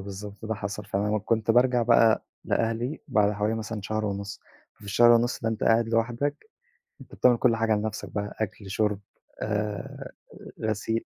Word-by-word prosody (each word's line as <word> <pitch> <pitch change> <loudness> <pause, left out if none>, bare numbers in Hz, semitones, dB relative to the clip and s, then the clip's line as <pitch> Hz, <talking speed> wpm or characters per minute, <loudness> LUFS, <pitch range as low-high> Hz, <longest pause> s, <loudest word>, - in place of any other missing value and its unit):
بالضبط، 100 +2 -8
ده 110 0 -2
حصل 100 +1 -5
فعلًا، 100 +1 -1
وكنت 110 +1 0
بارجع 125 +1 +4
بقى 115 -1 +4 0.2
لأهلي 115 +5 -1
بعد 105 -4 +3
حوالي 105 +2 0
مثلًا 110 -1 -4
شهر 110 +1 -2
ونُص، 100 0 -4 0.3
في - - -18
الشهر 120 +4 +5
ونُص 120 +1 +2
ده 115 - +1
أنت 110 -1 -2
قاعد 115 0 +3
لوحدك، 120 - -1 0.5
أنت - - -13
بتعمل 125 -2 +4
كل 115 -2 +3
حاجة 110 -1 +2
لنفْسك 105 0 -3
بقى 105 0 -4
أكل، 100 -2 -4
شُرب، 105 0 0 0.4
آآ، 105 -1 -3 0.5
غسيل. 110 +1 -1
110 Hz, 160 wpm, -26 LUFS, 105-115 Hz, 0.5 s, الشهر